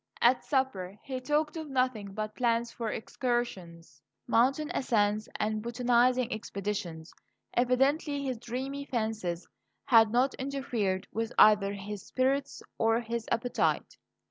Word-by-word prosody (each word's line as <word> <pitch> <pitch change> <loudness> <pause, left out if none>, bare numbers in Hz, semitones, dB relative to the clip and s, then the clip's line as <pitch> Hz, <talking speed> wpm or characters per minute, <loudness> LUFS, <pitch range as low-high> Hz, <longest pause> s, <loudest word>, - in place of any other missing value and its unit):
At 245 +1 +4
supper 210 -9 -1
he 260 -2 -4
talked 300 +3 0
of 315 -2 -5
nothing 255 -7 -1
but 215 0 -3
plans 235 -1 +1
for 230 -2 -4
excursions, 185 - -3 0.2
mountain 270 +7 +2
ascents, 215 - +1
and 215 0 -1
botanizing 245 +1 +2
expeditions. 195 -6 -5 0.4
Evidently 275 +4 +2
his 260 -4 -3
dreamy 265 +4 -4
fancies 220 -9 -3 0.4
had 225 -3 +6
not 255 +3 +3
interfered 245 -9 -1
with 225 +1 -2
either 205 -2 +6
his 200 0 -6
spirits 265 +2 -1 0.2
or 225 +1 +3
his 230 -1 -4
appetite. 235 +1 0
235 Hz, 120 wpm, -30 LUFS, 210-260 Hz, 0.4 s, had